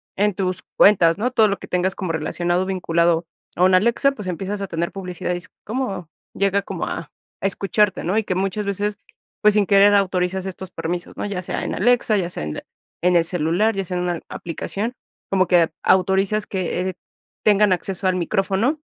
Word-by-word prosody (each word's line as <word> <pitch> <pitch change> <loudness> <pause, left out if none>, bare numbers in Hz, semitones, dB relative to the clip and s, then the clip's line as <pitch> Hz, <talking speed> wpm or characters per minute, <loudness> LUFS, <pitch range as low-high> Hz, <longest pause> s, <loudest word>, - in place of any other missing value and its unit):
en 205 +1 +2
tus 185 -1 -2
cuentas, 175 -5 +6
¿no? 240 +5 0
Todo 220 -3 +4
lo 200 - -1
que - - -10
tengas 180 +1 0
como 185 -4 -3
relacionado, 175 +3 -1
vinculado 170 -3 +1 0.3
a 180 - +3
un 185 0 +5
Alexa, 235 +8 +3
pues, 210 -8 -6
empiezas 195 +4 -4
a 195 - -3
tener 170 -1 -3
publicidad, 180 -2 -4
y - - -2
es 195 +4 -9 0.2
como 210 -7 -3 0.3
llega 200 0 +2
como - - -4
a - - -5 0.3
a - - +2
escucharte, 195 +1 +1
¿no? 180 +4 0
Y 220 - +2
que 185 - -1
muchas 195 +3 -1
veces, 205 +1 -2 0.4
pues, 210 0 +5
sin 210 -1 +4
querer 200 +1 +6
autorizas 185 -1 +1
estos 190 -1 -6
permisos, 175 +2 -4
¿no? - - -3
Ya 200 -3 -3
sea 180 - -4
en - - -3
Alexa, 235 0 +3
ya 175 -3 -1
sea 125 - -4
en 75 0 -4 0.4
en 180 +1 +3
el 170 -1 +4
celular, 175 +6 +1
ya 195 - -1
sea 180 0 -3
en 180 - -1
una 175 -2 -1
aplicación, 200 +7 -4 0.4
como 185 -2 +3
que 170 -3 +4
autorizas 190 +3 +2
que, 185 -1 -2
eh, - - -5 0.5
tengan 210 -2 +4
acceso 190 +1 -3
al 185 - +2
micrófono, 195 - 0
190 Hz, 200 wpm, -21 LUFS, 180-205 Hz, 0.5 s, cuentas